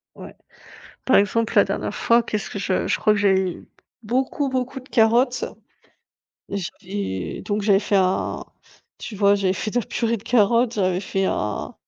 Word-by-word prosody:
Ouais, -, -, -11 dB, 0.7 s
par 260 Hz, -, +4 dB
exemple, 215 Hz, +3 st, +2 dB
la -, -, +7 dB
dernière -, -, -3 dB
fois, 235 Hz, +1 st, +3 dB
qu'est-ce 215 Hz, -1 st, -4 dB
que 200 Hz, -, -5 dB
je 185 Hz, -1 st, -1 dB
je -, -, 0 dB
crois 215 Hz, -, +3 dB
que 210 Hz, -, -1 dB
j'avais 190 Hz, -3 st, +2 dB, 0.5 s
beaucoup, 260 Hz, +5 st, -1 dB
beaucoup 260 Hz, +1 st, -3 dB
de 255 Hz, -, -17 dB
carottes. 235 Hz, +3 st, +3 dB, 1.0 s
J'avais 195 Hz, -, -5 dB
donc, 205 Hz, 0 st, -2 dB
j'avais 200 Hz, -1 st, +4 dB
fait 205 Hz, -1 st, 0 dB
un 185 Hz, 0 st, 0 dB, 0.5 s
tu 220 Hz, -, -8 dB
vois, 200 Hz, 0 st, +4 dB
j'avais 195 Hz, -2 st, +1 dB
fait 215 Hz, +3 st, -3 dB
de 245 Hz, -, +1 dB
la -, -, -9 dB
purée 230 Hz, -1 st, -1 dB
de 205 Hz, -, -12 dB
carottes, 235 Hz, 0 st, +2 dB
heu, -, -, +2 dB
j'avais 185 Hz, -1 st, +1 dB
fait 195 Hz, 0 st, -2 dB
un 105 Hz, -, -2 dB
210 Hz, 175 wpm, -22 LUFS, 195-235 Hz, 1.0 s, la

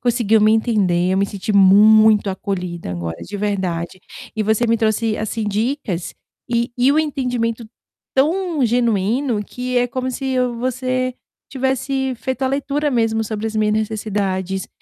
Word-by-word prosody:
conseguiu 230 Hz, -3 st, +2 dB
me 215 Hz, +1 st, +5 dB
entender, 200 Hz, -6 st, +1 dB
eu 190 Hz, -, +1 dB
me 200 Hz, -, +2 dB
senti 200 Hz, +1 st, -4 dB
muito 210 Hz, +2 st, +6 dB
acolhida 180 Hz, -, -4 dB
agora 85 Hz, -2 st, -4 dB
de 205 Hz, -, -6 dB
verdade, 185 Hz, -4 st, -2 dB, 0.3 s
e 220 Hz, -, -1 dB
você 220 Hz, +3 st, +2 dB
me 230 Hz, 0 st, +3 dB
trouxe 220 Hz, 0 st, 0 dB
assim 220 Hz, +1 st, -3 dB
dicas 210 Hz, -, -2 dB, 0.3 s
e 235 Hz, 0 st, 0 dB
e 250 Hz, +2 st, +4 dB
o 300 Hz, -, +2 dB
entendimento 245 Hz, -6 st, -1 dB, 0.5 s
tão 320 Hz, +1 st, +1 dB
genuíno 230 Hz, 0 st, +1 dB
que 250 Hz, +3 st, -4 dB
é 245 Hz, 0 st, +3 dB
como 255 Hz, 0 st, -3 dB
se 265 Hz, +2 st, -5 dB
eu 250 Hz, -2 st, 0 dB
você 255 Hz, +1 st, -1 dB, 0.4 s
tivesse 265 Hz, 0 st, -1 dB
feito 260 Hz, +2 st, -4 dB
a -, -, +2 dB
leitura 285 Hz, +2 st, -1 dB
mesmo 225 Hz, -3 st, +1 dB
sobre 215 Hz, 0 st, -4 dB
as 220 Hz, -, -6 dB
minhas 215 Hz, 0 st, +2 dB
necessidades, 200 Hz, -3 st, -2 dB
225 Hz, 155 wpm, -19 LUFS, 205-255 Hz, 0.5 s, muito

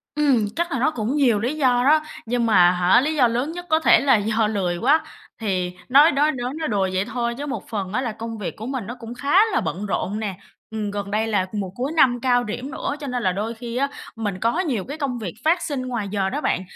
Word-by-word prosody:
Ừm, 265 Hz, -8 st, +2 dB
chắc 340 Hz, +1 st, -1 dB
là 265 Hz, -, -1 dB
nó 310 Hz, +5 st, +2 dB
cũng 240 Hz, +2 st, -2 dB
nhiều 245 Hz, -8 st, +3 dB
lý 245 Hz, +7 st, -1 dB
do 250 Hz, -4 st, +2 dB
đó, 305 Hz, +3 st, +5 dB, 0.3 s
nhưng 240 Hz, 0 st, 0 dB
mà 180 Hz, -5 st, +5 dB
hả, 180 Hz, +6 st, +4 dB
lý 310 Hz, +2 st, -1 dB
do 250 Hz, -4 st, +5 dB
lớn 245 Hz, +7 st, -1 dB
nhất 350 Hz, +1 st, -7 dB
có 315 Hz, 0 st, +4 dB
thể -, -, +5 dB
là 270 Hz, -3 st, +4 dB
do 215 Hz, +1 st, +1 dB
lười 185 Hz, -5 st, -1 dB
quá. 285 Hz, -, +3 dB, 0.4 s
Thì 185 Hz, -4 st, -1 dB, 0.2 s
nói 290 Hz, +5 st, +7 dB
đói 295 Hz, +2 st, +2 dB
nói 250 Hz, +1 st, -4 dB
nói 315 Hz, 0 st, -3 dB
đùa 195 Hz, -3 st, 0 dB
vậy 190 Hz, +2 st, 0 dB
thôi 235 Hz, -1 st, -2 dB
chứ 290 Hz, -, -4 dB
một 280 Hz, -, -5 dB
phần 200 Hz, -3 st, -4 dB
á 255 Hz, -, +1 dB
là 235 Hz, -4 st, -2 dB
công 225 Hz, +1 st, -6 dB
việc 205 Hz, -, -5 dB
của 220 Hz, -, -7 dB
mình 260 Hz, -5 st, -4 dB
nó 240 Hz, -, -6 dB
cũng 230 Hz, 0 st, -8 dB
khá 290 Hz, +9 st, +3 dB
là -, -, +2 dB
bận 180 Hz, +4 st, -3 dB
rộn 205 Hz, +1 st, -2 dB
nè. 200 Hz, -4 st, -3 dB, 0.4 s
Ừm, 210 Hz, -2 st, -3 dB
gần 200 Hz, -1 st, -5 dB
đây 220 Hz, +1 st, 0 dB
là 200 Hz, -4 st, +1 dB
mùa 200 Hz, -3 st, -3 dB
cuối 260 Hz, +4 st, -2 dB
năm 245 Hz, -5 st, +4 dB
cao 245 Hz, -1 st, +3 dB
điểm 245 Hz, +5 st, -5 dB
nữa 285 Hz, -, -3 dB
cho 285 Hz, -, -6 dB
nên 250 Hz, -2 st, -2 dB
là 185 Hz, -, +2 dB
đôi 210 Hz, +5 st, -3 dB
khi 235 Hz, +1 st, -7 dB
á 280 Hz, +1 st, +2 dB, 0.3 s
mình 205 Hz, -4 st, -3 dB
có 235 Hz, +10 st, +1 dB
nhiều 260 Hz, -, -1 dB
cái 290 Hz, -, -6 dB
công 270 Hz, -5 st, -2 dB
việc 190 Hz, -7 st, -5 dB
phát 340 Hz, +3 st, +3 dB
sinh 285 Hz, -5 st, -3 dB
ngoài 230 Hz, -5 st, -3 dB
giờ 195 Hz, -2 st, 0 dB
đó 290 Hz, -, -3 dB
bạn. 185 Hz, -, 0 dB
235 Hz, 265 wpm, -22 LUFS, 205-280 Hz, 0.4 s, nói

